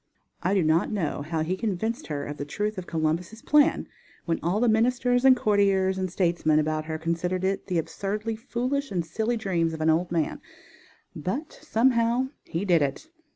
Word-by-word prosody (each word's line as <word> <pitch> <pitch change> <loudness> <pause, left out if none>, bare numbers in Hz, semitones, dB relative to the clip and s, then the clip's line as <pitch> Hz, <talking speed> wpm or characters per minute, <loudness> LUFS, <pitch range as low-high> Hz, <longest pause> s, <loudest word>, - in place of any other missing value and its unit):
I 185 +3 +1
do 190 - +3
not 160 +6 +2
know 180 -9 -2
how 155 +2 -2
he 175 +4 -1
convinced 220 - -2
her 145 -2 -3
of 145 0 -6
the - - -3
truth 205 +7 -3
of 180 - -9
Columbus' 170 +6 -2
plan, 295 -1 +3 0.4
when 165 -1 0
all 175 +5 0
the 245 - +3
ministers 245 +2 +2
and 260 -1 +7
courtiers 195 -3 +2
and 185 0 -1
statesmen 170 -4 +2
about 155 0 0
her 160 0 -3
considered 170 +3 -2
it 195 +1 -1
the 180 -3 0
absurdly 200 +7 -3
foolish 255 +4 -2
and 175 -4 -2
silly 220 +8 -1
dream 175 -6 0
of - - -8
an 160 0 +3
old 170 +2 0
man; 165 -3 -1 0.7
but, 245 - -4
somehow, 240 -2 +2 0.2
he 170 +5 -3
did 175 -4 +4
it. 145 - -2
190 Hz, 185 wpm, -26 LUFS, 165-225 Hz, 0.7 s, and